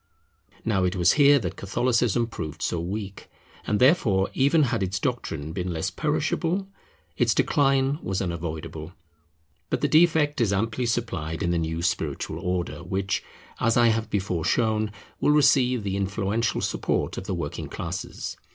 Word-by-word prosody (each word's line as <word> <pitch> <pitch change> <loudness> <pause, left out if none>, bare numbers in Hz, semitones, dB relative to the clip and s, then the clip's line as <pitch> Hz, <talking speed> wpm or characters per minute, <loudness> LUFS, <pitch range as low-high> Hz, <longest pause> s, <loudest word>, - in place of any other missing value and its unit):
Now 100 -4 +1
it 90 +1 0
was 85 -2 +4
here 145 -1 +6
that 95 -10 -3
Catholicism 120 +3 +1
proved 80 -8 -6
so 85 - -1
weak; 100 +3 -5 0.4
and 105 - +1
therefore, 120 - +3
even 145 +4 +3
had 120 -5 0
its 95 +1 -1
doctrine 80 - -3
been 90 0 -3
less 80 -1 -2
perishable, 185 +4 -1 0.5
its - - +2
decline 135 -1 +2
was 95 0 -2
unavoidable. 80 -2 -5 0.8
But - - -1
the - - +3
defect 155 -4 +3
is 110 -4 +2
amply 115 +5 0
supplied 90 -9 -2
in 85 - +1
the 85 - +1
new 80 +1 -2
spiritual 90 - -2
order, 90 -1 -3
which, 95 +1 -1 0.4
as 115 +1 +2
I 120 -1 +5
have 110 0 0
before 95 -4 -1
shown, 110 +3 +1 0.3
will 150 - +3
receive 130 -5 +4
the 100 -1 -2
influential 100 +3 -1
support - - -1
of - - -9
the - - -2
working - - -4
classes. - - -5
105 Hz, 155 wpm, -25 LUFS, 90-125 Hz, 0.8 s, here